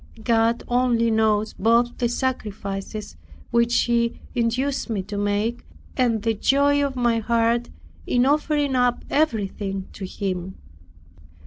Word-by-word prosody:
God 230 +1 +2
only 240 -2 +2
knows 220 -1 +2
both 235 +3 +2
the 240 - +1
sacrifices 210 - -4 0.3
which 235 0 +3
He 235 -1 0
induced 250 +4 -1
me 205 -4 -1
to 205 +2 -7
make, 205 +4 -1 0.3
and 235 -5 +1
the 225 -1 +1
joy 285 +6 +3
of 275 -1 -2
my 240 -2 +2
heart 235 +1 +1 0.4
in 245 0 +3
offering 290 -1 +1
up 245 -1 +1
everything 200 -8 -1
to 195 - -6
Him. 185 -2 -4
230 Hz, 125 wpm, -23 LUFS, 210-250 Hz, 0.4 s, which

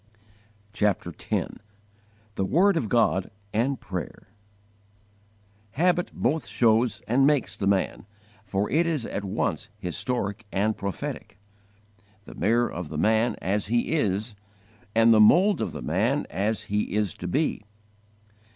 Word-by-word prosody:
CHAPTER 100 -4 0
X - - -3 0.8
THE 95 - -1
WORD 180 - +3
OF 140 -10 -1
GOD 105 -6 +2 0.2
AND 125 +5 0
PRAYER 95 0 -7 1.4
HABIT 175 +2 +1
both 150 +6 -1
shows 115 -1 +2
and 135 +4 +4
makes 145 -4 +1
the 100 - -2
man, 100 0 0 0.4
for 100 0 -1
it 170 +3 +2
is 155 -8 -1
at 100 - -4
once 105 +2 -2
historic 100 - -3
and 105 +2 +1
prophetic, 100 +2 -5 0.9
the - - -11
mirror 120 +3 +1
of 85 -3 -6
the 75 - -5
man 110 +7 +2
as 100 +2 0
he 120 +2 0
is 110 -6 0 0.6
and 115 0 +6
the 110 - +6
mould 180 - +5
of - - -2
the - - -7
man 110 - 0
as 105 +2 -1
he 105 -1 -2
is 105 -5 0
to 90 - -5
be. 145 - 0
110 Hz, 135 wpm, -26 LUFS, 100-130 Hz, 1.4 s, and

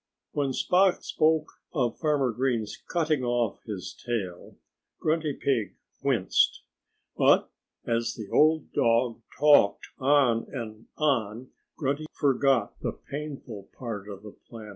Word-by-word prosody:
When 140 -2 0
Spot 180 +7 +2
spoke 155 0 +2 0.3
of 125 -5 0
Farmer 145 -5 +1
Green's 115 -3 -1
cutting 155 -5 0
off 120 -3 0
his 100 -5 -5
tail, 100 -8 -5 0.4
Grunty 155 -1 0
Pig 115 -10 -1 0.3
winced. 120 -9 +2 0.5
But - - +4 0.3
as 115 0 -1
the 110 -3 -7
old 155 0 +3
dog 115 0 +2 0.2
talked 145 -9 +4
on 130 -4 +3
and 115 -4 -7
on 125 -5 0 0.3
Grunty 145 +1 -2
forgot 135 -5 +2
the - - -3
painful 140 -8 -8
part 105 -5 -6
of 100 0 -9
the 105 - -9
plan. 110 0 -12
125 Hz, 120 wpm, -27 LUFS, 110-145 Hz, 0.5 s, But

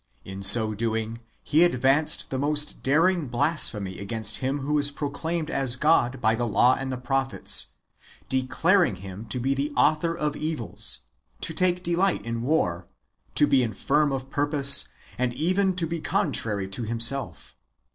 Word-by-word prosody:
In 95 0 -8
so 110 +2 +5
doing, 110 +1 -3 0.2
he 155 +3 +3
advanced 140 -1 +1
the 130 - -2
most 145 +1 -1
daring 165 +3 +1
blas 145 +7 +3
phemy 100 -3 -7
against 105 +1 0
Him 135 +2 -3
who 150 +2 0
is 145 0 +4
proclaimed 155 +3 -4
as 135 -3 +1
God 130 -3 +1
by 110 -2 +2
the 120 +1 -2
law 125 +3 +3
and 135 0 -5
the 130 - -4
prophets, 135 +1 0 0.6
declaring 160 +8 +1
Him 100 +3 -10
to 125 - -2
be 135 +3 0
the 140 +2 -2
author 165 +2 +1
of 150 -2 -2
evils, 155 - 0 0.4
to 165 - -1
take 180 +1 0
delight 175 -1 0
in 115 0 -4
war, 95 - -1 0.5
to 145 - +4
be 135 -2 +2
infirm 140 +6 0
of 135 0 -5
purpose, 145 -1 +4 0.3
and 125 -1 -1
even 185 +5 0
to 175 -2 0
be 165 +1 -4
contrary 105 -9 -2
to 95 - -3
Himself. 115 +4 0
135 Hz, 160 wpm, -24 LUFS, 115-155 Hz, 0.6 s, so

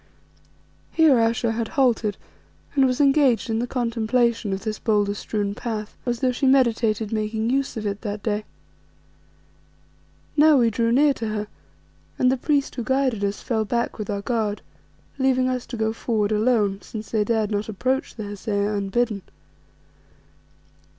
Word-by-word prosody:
Here 310 -6 +5
Ayesha 230 0 +1
had 225 0 -2
halted 235 -6 +2 0.6
and 270 -2 +4
was 255 +1 -1
engaged 275 -5 +3
in 225 - 0
the 245 - -1
contemplation 235 -2 0
of 195 0 -3
this 215 -1 -3
boulder 205 -2 +1
strewn 205 0 -3
path, 215 -1 -5
as 240 -1 -1
though 255 - +3
she 255 +2 0
meditated 230 -5 +2
making 220 +1 -1
use 275 -2 -1
of 215 - -4
it 200 0 -3
that 205 -2 -5
day. 210 -1 -1 1.9
Now 300 0 +6
we 235 -3 +3
drew 230 +2 +1
near 285 +3 +4
to 225 -4 -5
her, 210 -1 -3 0.7
and 255 - +3
the - - +2
priest 280 +1 0
who 240 - -4
guided 260 -3 0
us 200 0 -2
fell 225 -4 0
back 235 +2 -2
with 210 - -5
our 200 -1 -2
guard, 215 -3 -1 0.6
leaving 260 -1 +2
us 255 -1 -2
to 240 - -6
go 220 0 0
forward 220 -2 -1
alone, 210 -3 +2
since 220 -1 -8
they 215 -2 +2
dared 220 -1 0
not 205 +1 -2
approach 255 +6 -1
the 220 - -6
Hesea 205 0 -2
unbidden. 205 +1 -1
225 Hz, 160 wpm, -23 LUFS, 210-250 Hz, 1.9 s, Now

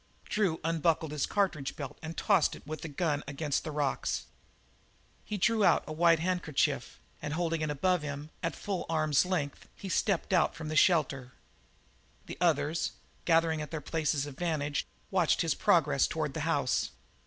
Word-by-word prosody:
Drew 195 -7 0
unbuckled 160 -1 +1
his 150 -2 -1
cartridge 180 -9 0
belt 140 -3 -7
and 160 +1 -7
tossed 155 - +3
it - - -14
with 155 +1 -6
his 160 -3 -7
gun 150 -4 0
against 145 0 -1
the - - -5
rocks. 145 -2 -1 1.0
He 210 - -3
drew 220 +2 +2
out - - +5
a 155 - -6
white 165 +1 +5
handkerchief, 170 -3 -1 0.2
and 150 +1 -3
holding 165 -1 -1
it 155 - -1
above 175 +4 +1
him, 145 +1 -6
at 165 - -2
a - - -13
full 195 -3 -3
arm's 155 -2 +3
length, 150 -7 -2
he 195 - -7
stepped 190 0 0
out 180 - +3
from 160 -1 -6
the 155 - -3
shelter. 140 -7 +3 0.9
The - - -8
others, 155 -2 +1 0.3
gathering 165 -2 +3
at 150 - -5
their 160 - -4
places 150 -1 -1
of 140 -2 -9
vantage, 150 -4 -1 0.2
watched 180 -4 +3
his 165 - +1
progress 145 -5 +3
toward 155 -3 -2
the - - -4
house. 145 -5 +1
160 Hz, 175 wpm, -30 LUFS, 145-170 Hz, 1.0 s, out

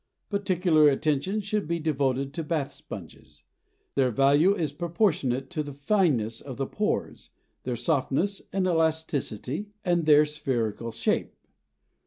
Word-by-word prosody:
Particular 180 -6 +3
attention 155 +8 0
should 210 -2 -2
be 170 +1 0
devoted 140 -3 -1
to 165 - -3
bath 150 -3 -2
sponges. - - -11 0.5
Their 130 -2 +2
value 140 - +4
is 160 -7 -1
proportionate 150 - 0
to 160 -3 -1
the 145 -2 -7
fineness 140 - +1
of 130 -3 -8
the 135 - -1
pores, 210 +9 -3 0.4
their 125 -1 -1
softness 140 - 0
and 190 -1 0
elasticity, 160 - -1 0.2
and 175 -3 +1
their 150 0 +7
spherical 120 -6 -2
shape. 115 +1 -1
150 Hz, 130 wpm, -27 LUFS, 135-175 Hz, 0.5 s, their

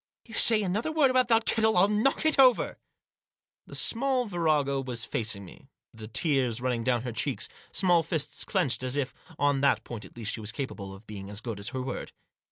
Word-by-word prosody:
"If - - -24
you - - -11
say 220 -1 +5
another 205 - -1
word 300 -4 +3
about 255 0 +3
that 225 -1 +3
kettle 220 -3 +3
I'll 185 +3 +6
knock 215 +9 +1
it 310 -3 +3
over! 255 -3 +4 0.4
" - - -60
The - - -10
small 255 +1 +1
virago 155 -8 0
was 120 -4 -3
facing 105 -3 -2
me, - - -15 0.3
the 110 -1 -10
tears 130 -2 0
running 125 -2 -1
down 120 -1 0
her 125 - -4
cheeks, 120 +4 -1
her - - -24 0.2
small 175 -3 +3
fists 155 -3 -1
clenched, 175 -12 0
as 130 +2 -2
if, 135 -2 -2 0.2
on 145 -1 +1
that 140 - +2
point 115 -3 -8
at - - -15
least, 110 -2 -2
she 115 - -5
was 105 +1 -1
capable 110 -6 -6
of 95 +3 -13
being 100 -2 -8
as 105 0 -2
good 115 -3 -6
as 100 +3 -3
her 130 0 -4
word. 130 -1 -6
140 Hz, 220 wpm, -28 LUFS, -, 0.4 s, I'll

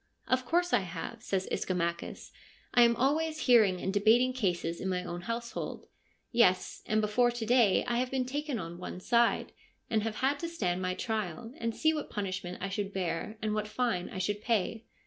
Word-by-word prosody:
' - - -39
Of 255 0 -7
course 350 +5 +1
I - - +6
have,' 185 +5 -6
says 190 -3 -1
Ischomachus. 170 -2 -2 0.2
' - - -30
I 245 - +6
am 235 0 +6
always 310 +5 +1
hearing 215 -7 +5
and 190 - -2
debating 225 +5 +4
cases 175 -8 -1
in 190 - -2
my 180 -1 -1
own 175 0 -5
household. 235 +5 -4 0.5
Yes, 185 -7 +3
and 215 0 +2
before 215 +4 +3
to 240 -1 -3
day 230 -4 +4
I 240 -1 0
have 255 0 0
been 260 -1 0
taken 285 0 -2
on 170 -2 -6
one 180 - -6
side, 235 +4 +2 0.4
and 220 -1 +3
have 220 0 -3
had 275 +4 +1
to 335 - -3
stand 185 - -1
my 185 0 -1
trial, 220 0 -3
to 230 0 0
see 315 +7 +2
what 305 - -4
punishment 185 -3 -4
I 195 - -1
should 200 0 -3
bear 190 +3 -3
and 215 -1 0
what 210 0 -1
fine 210 -5 -1
I - - -7
should 205 +3 -1
pay.' 225 0 0
215 Hz, 205 wpm, -31 LUFS, 185-245 Hz, 0.5 s, I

